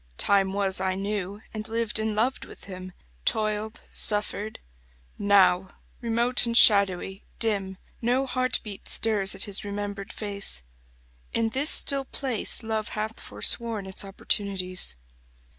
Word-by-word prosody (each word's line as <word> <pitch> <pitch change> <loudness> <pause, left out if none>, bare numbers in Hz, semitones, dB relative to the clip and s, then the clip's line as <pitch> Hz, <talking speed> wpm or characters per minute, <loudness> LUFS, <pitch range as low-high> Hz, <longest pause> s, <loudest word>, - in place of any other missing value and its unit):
Time 195 -1 +2
was 195 -1 0
I 190 -1 -1
knew, 200 0 -4
and 215 0 -6
lived 225 -1 -1
and 220 -1 -2
loved 245 +5 0
with - - -13
him; 185 -1 -9 0.3
Toiled, 215 - -2
suffered. 210 0 -2 0.6
Now, 190 -2 +3 0.3
remote 235 +1 +1
and 230 0 +2
shadowy, 195 -3 +4
dim, 200 -4 -2 0.2
No 250 +3 +1
heartbeat 255 -5 +1
stirs 205 -4 +4
at 195 - +1
his 205 0 0
remembered 200 -1 -5
face. 200 - +1 0.7
In 230 -1 0
this 275 +6 +2
still 275 -1 +4
place 255 -4 +1
Love 220 -1 -2
hath 215 +1 -4
forsworn 230 -4 0
its 190 +1 -3
opportunities. 190 - -1
210 Hz, 125 wpm, -26 LUFS, 195-225 Hz, 0.7 s, shadowy